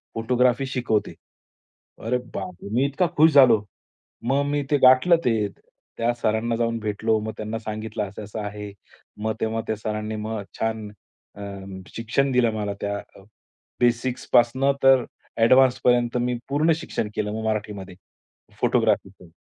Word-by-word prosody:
Photography 125 +3 +2
शिकवते." 120 -5 -1 0.9
अरे, 125 +2 +1 0.2
बापरे! 95 0 -6
मी 130 +3 +3
इतका 145 +6 +1
खुश 160 +1 +7
झालो. 120 -7 +6 0.6
मग 135 +4 +1
मी 145 0 -1
ते 145 - +5
गाठलं 130 +7 +7
ते. 110 -4 +2 0.5
त्या 115 +1 +1
सरांना 115 0 0
जाऊन 115 -1 0
भेटलो. 110 +1 0
मग 110 0 -5
त्यांना 110 +1 -4
सांगितलं 110 -1 -4
असं-असं 105 +2 -8
आहे. 105 0 -6 0.5
मग 110 0 0
तेव्हा 110 0 -1
त्या 110 - 0
सरांनी 110 0 -4
मग 110 -1 -4 0.2
छान 110 -1 -2 0.5
अ, 100 - -10 0.5
शिक्षण 130 +4 0
दिलं 120 -2 +3
मला 105 -1 -2
त्या 100 0 -2 0.2
अ, 95 - -15 0.6
बेसिक्सपासून 120 +2 +2
तर 135 -2 +6 0.3
ॲडवान्सपर्यंत 125 0 +4
मी 125 0 0
पूर्ण 155 +4 +2
शिक्षण 115 -9 -4
केलं 105 0 -2
मग 110 0 -4
मराठीमध्ये, 105 -4 -3 0.7
फोटोग्राफीचं 95 -2 +1
115 Hz, 135 wpm, -24 LUFS, 105-125 Hz, 0.9 s, खुश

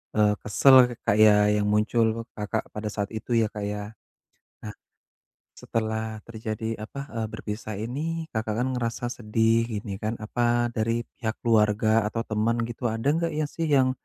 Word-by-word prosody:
eee, 105 -1 +4
kesel 130 +6 +5 0.3
kayak 105 0 +6 0.2
yang 105 0 +1
muncul 110 +2 +2 0.3
Kakak 105 -1 -2
pada 105 0 -3
saat 100 -1 -2
itu 120 - -8
ya 110 - +2
Kak 105 - -5
ya. 105 0 -4 0.8
Nah, 105 - -6 0.9
setelah 110 -1 -2 0.2
terjadi, 110 -1 -5 0.2
apa, 140 +5 -8
eee, 115 -1 -1
berpisah 105 0 -5
ini 160 +8 -3
Kakak 110 -1 -1
kan 130 - 0
ngerasa 120 +1 -3
sedih 115 0 +2
gini 105 -1 -4
kan, 110 +1 -1
apa 120 +1 +1
dari 115 +1 0 0.2
pihak 110 -3 -2
keluarga 110 -2 +3 0.2
atau 115 +1 -3
teman 110 +2 +1
gitu, 120 +1 -4
ada 115 +4 -2
gak 165 0 -1
ya 155 - +1
sih 165 -1 -1
yang, 130 -1 +4
110 Hz, 160 wpm, -26 LUFS, 105-120 Hz, 0.9 s, kayak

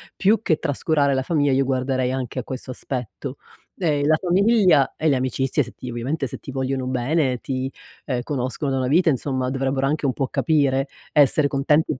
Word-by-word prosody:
più 215 +3 +3
che 160 -8 +1
trascurare 145 -1 +1
la 130 - +1
famiglia, 145 -2 +1
io 135 +1 +2
guarderei 130 -1 0
anche 130 -1 -3
a 125 - -4
questo 130 0 -6
aspetto. 125 -2 -6 0.4
Ehm, 150 -5 +1
la 155 - +5
famiglia 185 - +3
e 160 - +1
le 135 - +3
amicizie 130 +2 0
se 120 - -10
ti 125 - -8
ovviamente 135 +5 -2
se - - -6
ti - - -11
vogliono 130 0 -2
bene, 130 +1 0
ti, 130 0 -3 0.4
ehm, 125 -3 -1
conoscono 135 0 -2
una 130 -1 0
vita, 165 +5 +4
insomma 130 -2 -1
dovrebbero 135 0 -1
anche 150 0 -1
un 130 - +1
po' 135 +2 -1
capire, 140 -2 +1 0.3
essere 145 0 +5
contenti 150 +3 +2
135 Hz, 185 wpm, -22 LUFS, 130-150 Hz, 0.4 s, la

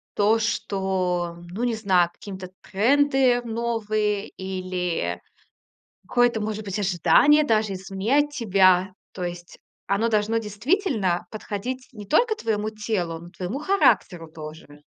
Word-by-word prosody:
то, 215 +2 +3
что 185 -5 -1
ну, 220 +7 -4
не 240 -2 +1
знаю, 185 -5 +2
каким-то 190 -3 -9
тренды 255 +5 +3
новые 215 -3 -1
или 180 - -3 0.9
какое-то, 245 0 +2
может 215 0 -3
быть, 195 0 -4
ожидание 210 - +4
даже 215 -6 +1
изменять 200 +10 0
тебя. 190 -7 +3 0.2
То 185 - -7
есть 175 0 -7 0.3
оно 200 +4 +1
должно 215 0 +1
действительно 215 - 0
подходить 225 +4 -5
не 210 -4 -10
только 445 - +3
твоему 215 -1 -1
телу, 210 -6 -3
но 170 - -12
и - - -16
твоему 185 +9 -4
характеру 280 - +2
тоже. 155 -2 -10
210 Hz, 125 wpm, -24 LUFS, 185-230 Hz, 0.9 s, ожидание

